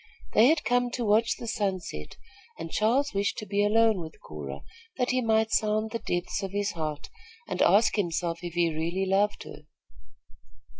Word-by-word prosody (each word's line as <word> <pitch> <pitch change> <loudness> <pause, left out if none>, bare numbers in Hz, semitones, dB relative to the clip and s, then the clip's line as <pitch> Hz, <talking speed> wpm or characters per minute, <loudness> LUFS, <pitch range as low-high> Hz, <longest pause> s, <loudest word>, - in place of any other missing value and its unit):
They 225 - +6
had 310 +1 +3
come 245 +2 +1
to 240 - -2
watch 220 +2 +3
the - - -7
sunset, 185 - -3 0.4
and 165 0 -7
Charles 250 +6 +1
wished 200 +1 0
to 215 - -5
be 205 0 0
alone 220 0 +3
with 160 -1 -9
Cora, 70 -2 -8 0.3
that 250 -1 +1
he 255 0 +1
might 220 -1 +2
sound 215 +1 +1
the 230 - -3
depths 175 +1 -2
of 195 - -3
his 205 0 0
heart 155 -3 -5 0.4
and - - -3
ask 220 +2 +4
himself 170 -3 -1
if 175 -1 -6
he 170 -2 +2
really 170 +5 -1
loved 200 +2 +1
her. 150 0 -12
205 Hz, 180 wpm, -27 LUFS, 170-225 Hz, 0.4 s, They